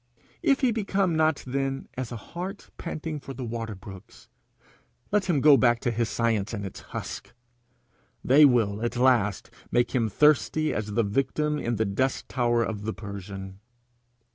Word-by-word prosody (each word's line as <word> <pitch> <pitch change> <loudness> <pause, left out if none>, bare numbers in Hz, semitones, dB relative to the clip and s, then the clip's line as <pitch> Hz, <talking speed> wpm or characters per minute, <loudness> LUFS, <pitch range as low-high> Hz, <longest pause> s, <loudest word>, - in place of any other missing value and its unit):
If 285 -6 +3
he 255 -3 +3
become 195 -5 0
not 155 -2 +2
then 135 +1 -2
as 130 -2 -4
a - - -4
hart 185 - -7
panting 155 -2 -4
for 135 -1 -9
the 130 - -5
water 115 -2 -4
brooks, 95 0 -13 0.8
let 205 -1 +2
him 165 -7 +1
go 145 -1 +7
back 120 -2 +3
to 120 - 0
his 115 0 -1
science 115 -2 0
and 100 -1 -5
its 95 - -7
husks: - - -7 0.9
they 140 +4 +6
will 115 -7 +4
at 120 +1 -1
last 120 -6 +2 0.2
make 120 0 +2
him 115 -4 +1
thirsty 150 +5 +3
as 105 -1 -3
the 115 - +2
victim 135 +7 0
in 120 -3 -1
the 110 +1 0
dust 130 +7 -1
tower 120 -2 +1
of 110 -3 -4
the 110 - -2
Persian. 95 -1 -8
120 Hz, 165 wpm, -26 LUFS, 110-150 Hz, 0.9 s, go